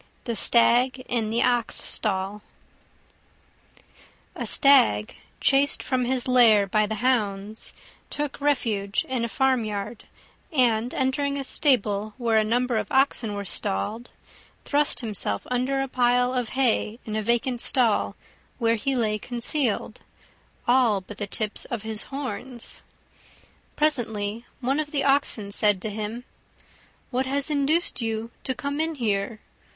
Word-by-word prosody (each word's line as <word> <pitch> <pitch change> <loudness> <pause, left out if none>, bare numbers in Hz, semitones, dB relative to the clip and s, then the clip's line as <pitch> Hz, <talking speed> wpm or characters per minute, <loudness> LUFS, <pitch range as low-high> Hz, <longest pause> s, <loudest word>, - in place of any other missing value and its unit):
THE 235 -3 -3
STAG 245 +4 +4
IN 230 -3 -1
THE 230 +2 +1
OX 240 -2 +1
STALL 200 0 -1 1.9
A - - -3
Stag, 110 - +4 0.3
chased 275 +1 +2
from 255 -2 0
his 255 0 0
lair 230 -5 +6
by 215 +2 +1
the 220 - -3
hounds, 210 -4 -1 0.4
took 295 -1 -4
refuge 215 -8 0
in 255 -3 -2
a - - 0
farmyard, 225 -4 -1 0.5
and, 245 -4 +2
entering 280 +2 0
a 275 - -3
stable 215 -7 0
where 230 -3 +2
a - - +2
number 240 +2 0
of - - -3
oxen 260 -5 +2
were 200 0 -5
stalled, 205 - -2 0.6
thrust 290 -1 +2
himself 200 - -2
under 255 +2 0
a - - -4
pile 245 0 +2
of 250 -3 -1
hay 230 -4 +1
in 215 - -4
a 215 - 0
vacant 240 +2 0
stall, 235 -5 +2 0.4
where 230 -1 +1
he 270 +5 -1
lay 215 -3 0
concealed, 240 -1 -1 0.7
all 240 -5 +3
but 205 +2 -11
the 205 - -3
tips 215 +1 +1
of 230 -4 -5
his 220 0 -3
horns. 260 -3 -6 0.9
Presently 230 -7 -1
one 270 +4 0
of 305 -1 -2
the 285 -2 -1
Oxen 275 -7 +1
said 205 -2 +2
to 215 - -3
him, 215 +3 -5 0.9
"What 260 +1 0
has 280 +2 -1
induced 295 +2 0
you 225 0 -3
to 260 - -1
come 280 +4 -3
in 320 0 -2
here? 215 -3 -1
240 Hz, 140 wpm, -25 LUFS, 215-265 Hz, 1.9 s, lair